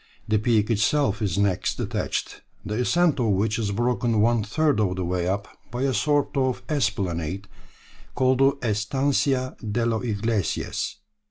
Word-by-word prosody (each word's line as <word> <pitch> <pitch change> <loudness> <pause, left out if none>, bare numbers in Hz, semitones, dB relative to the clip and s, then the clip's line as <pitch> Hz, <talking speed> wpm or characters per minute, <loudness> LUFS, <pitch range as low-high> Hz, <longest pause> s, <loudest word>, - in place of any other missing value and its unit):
The 110 -1 +2
peak 110 -1 +2
itself 110 +1 +1
is 100 -4 -1
next 100 -3 0
attached, - - -3 0.2
the 105 - -3
ascent 165 +2 +2
of 120 - +2
which 110 +4 0
is 105 -3 -1
broken 120 0 +1
one 115 0 +3
third 145 +5 +1
of 95 -4 +1
the 90 -1 -2
way 90 0 -1
up 100 +2 -1 0.2
by 120 +4 -3
a 135 -1 +1
sort 145 +1 +1
of 130 -2 0
esplanade 100 - -1 0.7
called 130 0 +2
the 135 +1 +4
Estancia 130 +4 0
de 110 +1 -1
los 115 -1 0
Ingleses. 110 -4 -1
110 Hz, 155 wpm, -24 LUFS, 100-130 Hz, 0.7 s, the